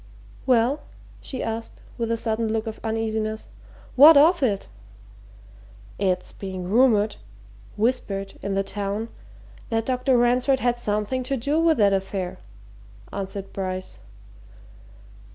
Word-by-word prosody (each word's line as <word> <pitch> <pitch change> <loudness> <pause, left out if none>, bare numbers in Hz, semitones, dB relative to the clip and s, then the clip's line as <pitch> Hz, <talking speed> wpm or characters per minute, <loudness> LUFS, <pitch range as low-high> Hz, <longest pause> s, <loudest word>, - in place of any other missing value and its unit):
"Well?" 255 +4 +3 0.4
she 260 - -5
asked, 225 0 -5 0.2
with 230 -1 -1
a 230 - 0
sudden 225 -1 -1
look 220 0 -1
of 220 -1 -6
uneasiness. 220 -1 -2 0.5
"What 295 +4 +9
of 330 +4 +5
it?" 205 -7 0 1.3
"It's 185 -2 0
being 190 -2 -6
rumoured 215 -1 +3 0.6
whispered 205 -4 -1
in 200 -1 -2
the 195 - +1
town 205 +3 -4 0.6
that 225 -1 0
Dr. 255 +1 +2
Ransford 250 +3 +3
had 245 -1 +1
something 215 +2 -1
to 270 +1 -1
do 285 +6 0
with 330 -2 +3
that 200 -3 +4
affair," 190 -1 -3 0.7
answered 195 0 -6
Bryce. 185 -1 -5
225 Hz, 120 wpm, -24 LUFS, 200-250 Hz, 1.3 s, What